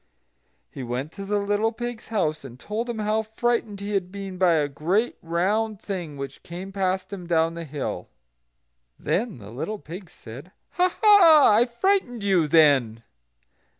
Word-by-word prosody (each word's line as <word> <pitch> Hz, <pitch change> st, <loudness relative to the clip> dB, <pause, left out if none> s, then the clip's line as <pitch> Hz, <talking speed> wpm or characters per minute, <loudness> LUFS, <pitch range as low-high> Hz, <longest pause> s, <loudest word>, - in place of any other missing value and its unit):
He -, -, -8 dB
went 125 Hz, +4 st, -4 dB
to 195 Hz, -, -8 dB
the 205 Hz, +1 st, 0 dB
little 205 Hz, +2 st, 0 dB
pig's 240 Hz, 0 st, -6 dB
house, 155 Hz, -9 st, -1 dB
and 130 Hz, -2 st, -11 dB
told 225 Hz, -, -4 dB
him 235 Hz, -, -3 dB
how 215 Hz, +1 st, 0 dB
frightened 220 Hz, -1 st, -2 dB
he 205 Hz, +1 st, -4 dB
had 185 Hz, -2 st, -1 dB
been 195 Hz, -2 st, -7 dB
by 180 Hz, -2 st, +4 dB
a 150 Hz, -3 st, +2 dB
great 175 Hz, -, 0 dB
round 200 Hz, +6 st, -1 dB
thing 175 Hz, -9 st, -5 dB
which 140 Hz, 0 st, -7 dB
came 180 Hz, +3 st, -8 dB
past 190 Hz, 0 st, -2 dB
him 180 Hz, -3 st, -7 dB
down 165 Hz, -1 st, +2 dB
the 170 Hz, 0 st, -6 dB
hill. 145 Hz, -2 st, -5 dB, 0.9 s
Then 225 Hz, -, -2 dB
the 105 Hz, -2 st, -11 dB
little 205 Hz, -, -4 dB
pig 180 Hz, 0 st, -10 dB
said: 140 Hz, -, -12 dB, 0.2 s
"Ha! 365 Hz, 0 st, +1 dB
ha! 335 Hz, -, +7 dB
I 235 Hz, +3 st, +4 dB
frightened 245 Hz, -, 0 dB
you, 185 Hz, -6 st, +2 dB
then!" 135 Hz, -8 st, +3 dB
195 Hz, 165 wpm, -24 LUFS, 160-220 Hz, 0.9 s, ha